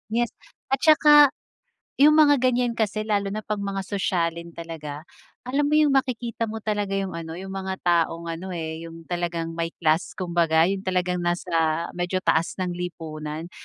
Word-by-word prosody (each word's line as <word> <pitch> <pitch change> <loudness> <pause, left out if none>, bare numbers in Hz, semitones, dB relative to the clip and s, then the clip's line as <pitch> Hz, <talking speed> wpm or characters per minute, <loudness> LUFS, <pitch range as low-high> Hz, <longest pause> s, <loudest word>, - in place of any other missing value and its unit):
yes, 240 -1 +1 0.4
at 270 - +2
saka, 300 -2 +7 0.7
'yong 300 +2 +7
mga 300 -2 +6
ganiyan 245 -2 +2
kasi 215 -1 -1
lalo 205 -2 +1
na 215 - -3
pag 210 0 -3
mga 195 -1 -3
sosyalin 170 -4 -2
talaga, 155 -3 -7 0.4
alam 275 +4 0
mo 300 - 0
'yong 305 -2 +4
makikita 245 -4 0
mo 220 0 -6
talaga 205 -2 -1
'yong 195 -1 -2
ano, 165 -1 -6
'yong 190 +2 -7
mga 190 0 -4
taong 170 -1 +1
ano, 180 +3 -6
eh, 160 0 -5
'yong 165 0 -11
talagang 170 -1 -3
may 165 0 -2 0.2
class 160 +2 +1
kumbaga, 170 -3 +2
'yong 190 +3 +1
talagang 180 -1 0
nasa 175 +1 -2 0.4
medyo 180 +1 -2
taas 160 +1 +1
ng 185 -1 -2
lipunan. 160 -2 -6
185 Hz, 165 wpm, -24 LUFS, 165-215 Hz, 0.7 s, saka